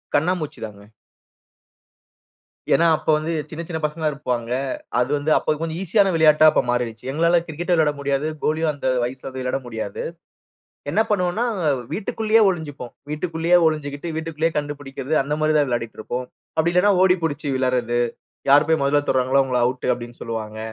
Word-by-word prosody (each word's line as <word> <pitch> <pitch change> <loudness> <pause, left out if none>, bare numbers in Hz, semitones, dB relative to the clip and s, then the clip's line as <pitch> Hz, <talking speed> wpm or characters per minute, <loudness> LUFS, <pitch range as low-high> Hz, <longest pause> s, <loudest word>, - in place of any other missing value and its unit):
கண்ணாம்மூச்சி 160 +1 0
தாங்க. 105 0 -13 1.8
ஏன்னா, 165 +4 +4
அப்போ 155 - 0
வந்து, 155 +2 -2 0.2
சின்ன 165 +1 -6
சின்ன 160 -2 -3
பசங்களா 150 +1 0
இருப்பாங்க. 125 -5 -3 0.5
அது 125 +2 +1
வந்து, 145 +2 -1
அப்போ - - 0
கொஞ்சம் 165 0 -3
ஈசியான 195 +2 +3
விளையாட்டா 155 -1 +5
அப்ப - - +3
மாறிருச்சு. 120 -1 -2
எங்களால 170 +3 +3
கிரிக்கெட் 170 +3 -4
விளையாட 155 -3 +3
முடியாது. 140 +1 -1 0.2
கோலியும் 155 +1 +1
அந்த 140 -2 -4 0.2
வயசில 130 +2 -5
போய் 130 0 -6
விளையாட 130 +1 -1
முடியாது. 110 -4 -5 0.9
என்ன 210 - +3
பண்ணுவோம்ன்னா, 200 +3 +1 0.5
வீட்டுக்குள்ளேயே 220 +1 +1
ஒளிஞ்சுப்போம். 145 -8 -5 0.2
வீட்டுக்குள்ளேயே 165 +2 +1
ஒளிஞ்சுக்கிட்டு, 150 +1 -3
வீட்டுக்குள்ளேயே 160 0 -1
கண்டுபிடிக்கிறது 145 0 -3
அந்த 145 +2 -2
மாரி 155 0 +2
தான் 145 -1 +2
விளையாடிட்டு 115 -2 -3
இருப்போம். 125 +3 -4 0.3
அப்டி 170 +2 +2
இல்லன்னா 200 +3 +4
ஓடி 185 -1 +5
பிடிச்சு 150 -1 -2
விளாடுறது, 125 -2 0 0.5
"யார் 145 +2 +6
போய் 160 -2 +3
மொதல்ல 145 +1 +2
தொடுகிறாங்களோ 130 +1 +3
அவுங்கள 125 -2 0
ஆவுட்டு" 125 +1 -1
அப்டின்னு 120 0 -10
சொல்லுவாங்க. 110 -2 -5
150 Hz, 155 wpm, -22 LUFS, 125-165 Hz, 1.8 s, யார்